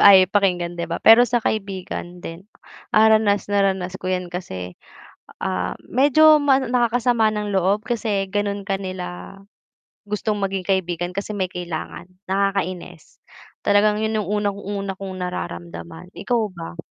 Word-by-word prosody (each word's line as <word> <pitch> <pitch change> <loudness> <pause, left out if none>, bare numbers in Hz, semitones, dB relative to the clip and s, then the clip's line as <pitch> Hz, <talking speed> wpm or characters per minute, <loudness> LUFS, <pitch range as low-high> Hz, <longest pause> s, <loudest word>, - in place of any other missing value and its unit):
ay, 200 -1 +10
pakinggan 180 -4 +1
di 170 - -1
ba, 170 - -2
pero 225 +2 +8
sa 240 +1 0
kaibigan 190 -4 -4
din, 165 +3 -8 0.5
ah, 220 +1 +6
ranas 215 -2 +3
na 200 - +3
ranas 190 -1 -1
ko 185 - -4
'yan 180 -1 -1
kasi, 90 - -6 0.7
ah, 90 -1 -2
medyo 300 +4 +5
ma 275 -2 +4
nakakasama 240 -2 +2
ng 210 -1 -3
loob 195 +3 +2
kasi 215 -5 -1
gano'n 205 0 -2
ka 195 - +1
nila 185 0 -7 0.7
gustong 210 +1 -1
maging 195 -2 -2
kaibigan 175 -2 -1
kasi 200 +2 -3
may 190 -2 0
kailangan, 175 0 -6 0.2
nakakainis, 185 -3 -2 0.4
talagang 210 +1 +3
'yun 220 0 0
'yung 210 - -3 0.2
unang-una 200 -1 -3
kong 190 -1 -6
nararamdaman. 85 - -6
Ikaw 230 +5 0
ba? 170 -2 -8
195 Hz, 140 wpm, -22 LUFS, 180-215 Hz, 0.7 s, ay